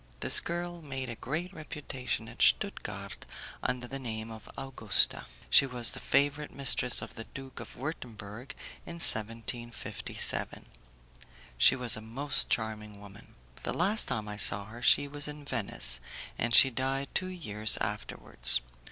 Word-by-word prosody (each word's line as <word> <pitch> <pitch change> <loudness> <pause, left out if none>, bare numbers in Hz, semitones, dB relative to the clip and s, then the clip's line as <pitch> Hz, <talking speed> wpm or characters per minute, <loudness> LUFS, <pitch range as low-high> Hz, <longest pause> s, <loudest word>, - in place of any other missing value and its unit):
This - - +6
girl 175 0 -6
made 135 -4 -6
a 120 - -6
great 165 - -5
reputation 150 -6 -6
at - - -13
Stuttgard - - -1 0.4
under 125 -1 -3
the 135 +2 -7
name 110 -3 -7
of 110 -1 -12
Augusta. 125 -7 0 0.2
She 140 - +5
was 125 -2 +3
the - - -4
favourite 145 +1 0
mistress 130 -2 +2
of - - -11
the 115 - -10
Duke 135 -1 -11
of - - -11
Wurtemburg 120 -4 -8 0.3
in - - -9
1757. 115 -3 +1 0.9
She - - +5
was 125 -3 +3
a 110 - -8
most 130 +6 +1
charming 105 -2 -4
woman. 100 0 -16 0.3
The - - -4
last 200 +6 +3
time 105 -2 -4
I 105 0 -7
saw 100 -1 +7
her 115 +3 -12
she 145 +3 +3
was 145 +1 -2
in 150 -1 -9
Venice, 120 -7 -1 0.4
and 120 0 0
she 135 - +8
died 135 +2 -3
two 185 - -1
years 110 - -2
afterwards. 60 0 +1
125 Hz, 150 wpm, -29 LUFS, 110-145 Hz, 0.9 s, she